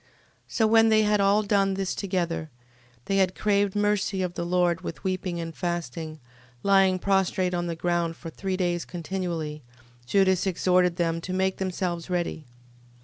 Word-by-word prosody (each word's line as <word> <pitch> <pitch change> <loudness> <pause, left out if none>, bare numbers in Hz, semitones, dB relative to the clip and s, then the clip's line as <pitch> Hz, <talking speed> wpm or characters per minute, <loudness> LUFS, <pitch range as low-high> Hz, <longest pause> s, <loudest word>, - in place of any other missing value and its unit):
13:12. - - -33 0.5
So 225 - +3
when 225 +1 +5
they 215 0 +4
had 210 -1 +2
all 200 +2 +3
done 195 -2 +2
this 195 -1 -2
together, 175 -5 -2 0.6
and 195 0 +1
had 185 -1 +2
craved 205 -1 +1
mercy 205 -2 +1
of 180 -1 -3
the 170 - -3
Lord 175 -1 +1
with 165 -4 -7
weeping 185 -2 -2
and 165 -1 -5
fasting, 165 -3 -4 0.4
lying 195 -2 +4
prostrate 190 -1 +1
on 175 0 -1
the 170 - -3
ground 170 -1 -1
for 165 0 -9
three 190 +1 -3
days 175 -2 0
continually, 170 -3 -4 0.5
Judas 190 +3 +3
exhorted 180 -1 +2
them 165 -1 -1
to 185 - -5
make 190 0 0
themselves 180 -2 -3
ready. 175 -3 -2
185 Hz, 165 wpm, -26 LUFS, 170-195 Hz, 0.6 s, when